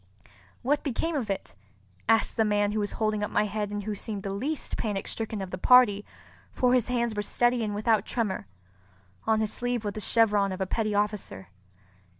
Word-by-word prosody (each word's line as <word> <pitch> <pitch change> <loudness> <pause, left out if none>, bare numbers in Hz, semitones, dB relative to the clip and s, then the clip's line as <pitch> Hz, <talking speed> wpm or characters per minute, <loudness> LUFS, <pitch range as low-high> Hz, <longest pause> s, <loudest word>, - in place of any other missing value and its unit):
"What 290 +3 +2
became 315 +4 -2
of 245 -7 -2
it?" 195 - -3 0.6
asked 225 -1 +3
the 225 - +3
man 205 -1 +2
who 215 - -1
was 205 -1 -2
holding 215 -1 0
up 210 - -1
my 210 - +2
head 210 0 -2
and 205 0 -4
who 215 +1 -3
seemed 205 -1 -5
the 195 - -3
least 275 +10 -3
panic 205 -3 -2
stricken 220 -3 -3
of 185 - -8
the 185 - -5
party, 215 -3 +6 0.5
for 250 -1 +2
his 250 -3 +3
hands 235 -2 0
were 210 - -1
steady 240 +3 +1
and 210 -1 -2
without 215 0 +2
tremor. 210 - -2 0.8
On 220 -1 +3
his 215 - -1
sleeve 245 -2 -2
was 205 - -2
the 215 - -5
chevron 210 -3 +3
of 185 - -5
a 190 - 0
petty 215 +2 -1
officer. 205 - -2
215 Hz, 200 wpm, -27 LUFS, 205-235 Hz, 0.8 s, party